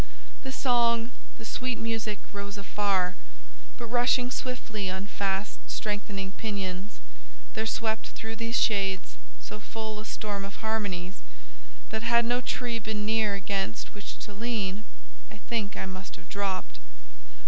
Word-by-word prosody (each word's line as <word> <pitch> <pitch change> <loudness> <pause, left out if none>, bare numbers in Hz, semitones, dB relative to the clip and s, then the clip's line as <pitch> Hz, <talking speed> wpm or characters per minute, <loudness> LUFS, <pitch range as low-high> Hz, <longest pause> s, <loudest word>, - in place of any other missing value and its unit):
The 265 - -3
song, 235 -3 +4 0.3
the - - -8
sweet 250 +2 0
music, 225 -2 0 0.2
rose 200 0 -3
afar, 195 -2 +2 0.6
but 235 - -4
rushing 245 +1 +4
swiftly 225 -7 -1
on 190 +1 -1
fast 200 0 0
strengthening 205 -2 -1
pinions—there 185 - -4
swept 220 -1 +1
through 225 0 -5
these 230 +2 +2
shades 195 - +3 0.2
so - - -6
full 220 - -3
a 215 - -6
storm 205 -3 -2
of 200 +1 -5
harmonies 200 -4 0 0.7
that, 220 - 0
had 235 0 +5
no 245 +1 +3
tree 240 -2 0
been 210 -1 -1
near 215 -2 +4
against 195 - -1
which 205 -1 -6
to 210 - -8
lean, 215 -2 0 0.4
I 210 - -9
think 215 -2 -1
I - - 0
must 185 +1 -5
have - - -13
dropped. 190 - -1
210 Hz, 135 wpm, -30 LUFS, 195-230 Hz, 0.7 s, had